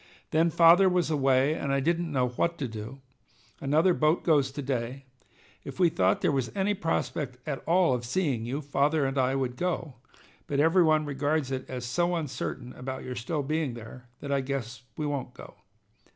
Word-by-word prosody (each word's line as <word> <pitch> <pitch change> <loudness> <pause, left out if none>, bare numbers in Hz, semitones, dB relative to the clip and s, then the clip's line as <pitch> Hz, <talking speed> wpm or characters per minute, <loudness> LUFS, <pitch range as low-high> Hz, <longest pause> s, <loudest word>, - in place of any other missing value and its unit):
Then 165 +2 +3
father 170 +4 +6
was 180 -3 +1
away, 135 0 +3
and 140 -3 -3
I 140 - +2
didn't 170 +3 0
know 130 -3 +1
what 170 +7 -1
to 135 - -3
do. 110 +4 -8 0.6
Another 155 +6 +3
boat 155 +1 +2
goes 145 -5 +3
to 145 +1 -6
day. 130 0 -3 0.6
If - - -9
we 175 -2 +5
thought 95 -8 +1
there - - +2
was 135 -4 -1
any 200 +1 +1
prospect 155 -7 -2
at 140 -3 -3
all 170 -4 +4
of 125 -1 -2
seeing 130 -2 -1
you, 130 +6 -3
father 145 +1 +1
and 135 +1 -1
I 130 +1 +2
would 130 -2 -2
go, 170 -6 -2 0.5
but 140 - -1
every 165 +5 +4
one 155 -2 +3
regards 145 0 -1
it 130 -1 -4
as 125 -1 -5
so 175 +8 0
uncertain 130 -4 -4
about 130 +1 -6
your 130 - -5
still 145 +5 -3
being 155 -3 -1
there 120 +2 -11
that 140 - -5
I 140 -1 +2
guess 130 -4 -4 0.2
we 150 - -2
won't 135 -4 -3
go. - - -11
140 Hz, 195 wpm, -28 LUFS, 130-160 Hz, 0.6 s, father